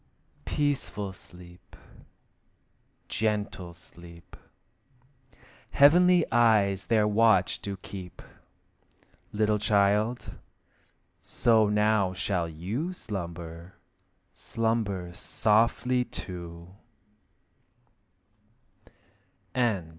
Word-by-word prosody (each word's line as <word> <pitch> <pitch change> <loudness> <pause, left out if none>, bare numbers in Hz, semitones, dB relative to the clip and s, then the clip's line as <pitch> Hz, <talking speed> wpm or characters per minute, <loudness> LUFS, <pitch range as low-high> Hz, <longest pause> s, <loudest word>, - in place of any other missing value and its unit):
Peaceful 135 -9 -2
sleep, 90 -1 -14 1.3
gentle 105 -4 -2
sleep! 85 0 -13 1.3
Heavenly 175 +4 +5
eyes 105 -4 +3
their 110 -2 +2
watch 105 -3 +3
do 100 -1 -5
keep. 95 -2 -10 1.1
Little 105 0 +1
child, 105 +3 +1 0.8
so 110 -3 +2
now 105 -2 +2
shall 90 -2 -2
you 105 - -4
Slumber, 85 - -7 0.6
slumber 110 -6 -2
softly 115 +6 +1
too! 85 -4 -8
105 Hz, 60 wpm, -27 LUFS, 90-115 Hz, 1.3 s, Heavenly